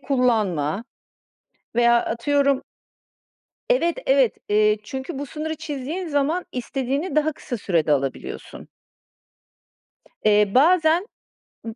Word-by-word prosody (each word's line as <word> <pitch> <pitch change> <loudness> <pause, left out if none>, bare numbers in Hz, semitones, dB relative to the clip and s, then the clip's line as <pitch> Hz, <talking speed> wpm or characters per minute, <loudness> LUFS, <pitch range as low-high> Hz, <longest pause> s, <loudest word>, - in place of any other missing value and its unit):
kullanma 215 - 0 0.9
veya 235 0 +4
atıyorum 275 +3 +1 1.1
Evet 340 -10 +2
evet, 265 -3 +3
eee, 210 0 +3
çünkü 265 +6 -6
bu 285 - -4
sınırı 310 +4 -4
çizdiğin 300 +6 -5
zaman 300 +4 0
istediğini 270 +5 -3
daha 305 +1 +2
kısa 250 -4 -6
sürede 165 -7 +1
alabiliyorsun. 135 -1 -4 1.6
Eee, 210 -1 +4
bazen 330 +5 +4 0.6
ı 225 - -6
265 Hz, 95 wpm, -23 LUFS, 215-305 Hz, 1.6 s, veya